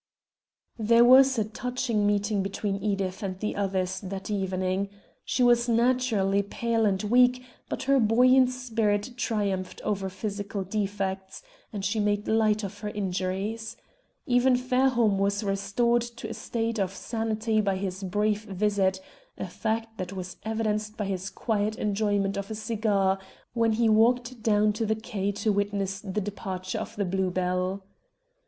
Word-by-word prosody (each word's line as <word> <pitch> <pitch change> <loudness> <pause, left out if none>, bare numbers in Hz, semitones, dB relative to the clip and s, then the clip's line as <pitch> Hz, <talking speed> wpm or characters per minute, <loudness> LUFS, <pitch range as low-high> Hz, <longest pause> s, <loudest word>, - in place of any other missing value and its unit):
There 230 +2 +5
was 265 +1 +7
a 220 - +2
touching 230 -1 -1
meeting 205 0 +1
between 195 +1 -3
Edith 195 -2 -1
and 190 -2 -4
the 215 - -2
others 190 -2 -1
that 195 +2 -6
evening. 190 0 -1 0.3
She 255 - 0
was 240 0 +4
naturally 230 -5 +2
pale 225 +2 0
and 190 -1 0
weak, 250 +3 +4 0.3
but - - -3
her 275 0 +3
buoyant 250 +3 +5
spirit 225 -4 -1
triumphed 200 -6 -2
over 195 -2 -1
physical 200 0 -4
defects, 195 - -3 0.3
and 200 -3 -4
she 215 +2 0
made 205 0 0
light 215 -1 +2
of 200 +1 -6
her 210 0 -4
injuries. 200 +3 -3 0.5
Even 250 +1 +4
Fairholme 250 -5 +2
was 200 +2 +1
restored 205 +5 +1
to 235 0 -7
a - - -5
state 230 -1 -2
of 190 -2 0
sanity 220 -1 -1
by 200 -2 0
his 190 0 -4
brief 210 +3 0
visit, 195 -1 +1 0.4
a - - -4
fact 225 0 -3
that 185 +1 -4
was 185 -2 -6
evidenced 215 -1 -2
by 210 - -2
his 190 0 -3
quiet 215 -1 -1
enjoyment 205 -1 0
of 200 0 -4
a 220 - -4
cigar 210 -3 +1 0.3
when 230 -2 +2
he 230 +1 +2
walked 235 +2 +3
down 210 -1 +3
to 220 +2 -2
the 220 0 +1
quay 205 -2 -3
to 210 +1 0
witness 200 -1 -1
the 200 0 -3
departure 190 0 -4
of 220 - -6
the 205 - -1
Blue 190 +1 0
Bell. 185 +1 -1
210 Hz, 155 wpm, -27 LUFS, 195-225 Hz, 0.5 s, was